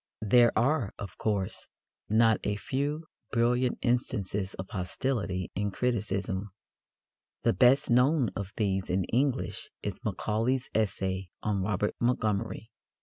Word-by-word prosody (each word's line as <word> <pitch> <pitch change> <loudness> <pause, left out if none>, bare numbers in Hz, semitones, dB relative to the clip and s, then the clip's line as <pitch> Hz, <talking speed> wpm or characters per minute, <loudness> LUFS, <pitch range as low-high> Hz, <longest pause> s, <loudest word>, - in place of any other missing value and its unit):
There 120 +2 +6
are, 120 -2 +1
of 100 - -7
course, 100 -4 -1 0.4
not 110 +1 +4
a 105 - 0
few 145 +8 -2 0.3
brilliant 120 +2 +2
instances 105 -6 -1
of 95 - -6
hostility 95 -1 -2
in 100 +1 -1
criticism. 100 -3 -1 0.9
The - - +3
best 125 +7 +4
known 125 0 +4
of 100 -1 -4
these 95 -3 0
in 95 +1 +1
English 130 +1 0
is - - -5
Macaulay's 120 +5 -1
essay 95 -3 -1
on 105 -2 0
Robert 105 +1 0
Montgomery. 110 -2 0
110 Hz, 120 wpm, -29 LUFS, 95-125 Hz, 0.9 s, There